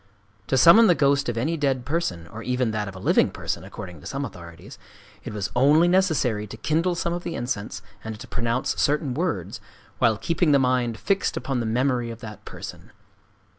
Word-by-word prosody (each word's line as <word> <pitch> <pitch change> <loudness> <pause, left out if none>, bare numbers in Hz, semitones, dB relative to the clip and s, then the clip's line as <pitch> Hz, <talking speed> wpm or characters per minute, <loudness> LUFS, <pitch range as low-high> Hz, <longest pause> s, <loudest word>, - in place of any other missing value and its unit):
To 130 - +1
summon 205 - +8
the 175 - +5
ghost 140 -2 +2
of 120 - -3
any 155 +8 0
dead 135 -4 0
person—or 110 - -3
even 125 0 0
that 105 -1 -2
of 100 - -8
a - - -8
living - - +3
person, - - -4
according 90 -6 -9
to - - -10
some 140 +1 -3
authorities,—it 100 +3 -12
was 105 -2 -4
only 145 +7 +5
necessary 155 - +2
to 110 - -9
kindle 165 +9 0
some 170 0 -1
of 175 - -3
the 170 - -4
incense, 105 -4 -4 0.2
and 110 -1 -6
to - - -9
pronounce 120 +1 -1
certain 145 -2 +1
words, 165 +4 -2 0.4
while 110 -2 +3
keeping 165 - +1
the - - +6
mind 125 -3 +1
fixed 195 +9 0
upon 130 0 -2
the 115 - -2
memory 125 +1 0
of 115 -1 -7
that 105 -2 -9
person. - - -9
125 Hz, 190 wpm, -24 LUFS, 110-150 Hz, 0.4 s, summon